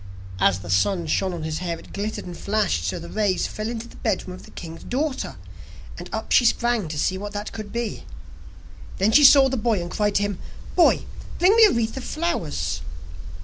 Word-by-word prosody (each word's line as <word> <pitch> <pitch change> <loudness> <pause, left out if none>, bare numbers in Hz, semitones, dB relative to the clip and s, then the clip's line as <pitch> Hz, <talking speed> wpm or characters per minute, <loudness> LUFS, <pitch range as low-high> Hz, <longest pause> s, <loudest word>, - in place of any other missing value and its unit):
As 95 -1 +4
the 90 - -9
sun 170 - +2
shone 185 +4 0
on 170 -3 -5
his 155 0 -3
hair 170 -2 -3
it - - -15
glittered 210 +2 -4
and 175 - -7
flashed 200 - 0
so 80 - -2
that - - -8
the - - -11
rays 205 -4 +1
fell 215 +1 -4
into 235 0 -5
the - - -15
bedroom 190 -4 -2
of 185 - -11
the - - -15
king's 165 -1 -9
daughter, 275 +2 -2 0.6
and - - -9
up - - -5
she - - +6
sprang 235 -4 +2
to 155 0 -5
see 185 +5 0
what 205 +1 -6
that 205 +1 -4
could 215 -2 -7
be. 235 -2 -3 0.9
Then 200 +3 +2
she 295 - +6
saw 275 -1 +8
the 265 0 -2
boy, 220 -2 +1
and 175 0 -5
cried 210 -1 0
to 205 - +3
him: 205 -2 -2 0.4
'Boy, 350 - +4 0.3
bring 370 +5 +5
me 455 -1 +8
a 415 - +5
wreath 230 -1 -1
of 265 - -5
flowers. 80 - -2
205 Hz, 220 wpm, -23 LUFS, 175-240 Hz, 0.9 s, saw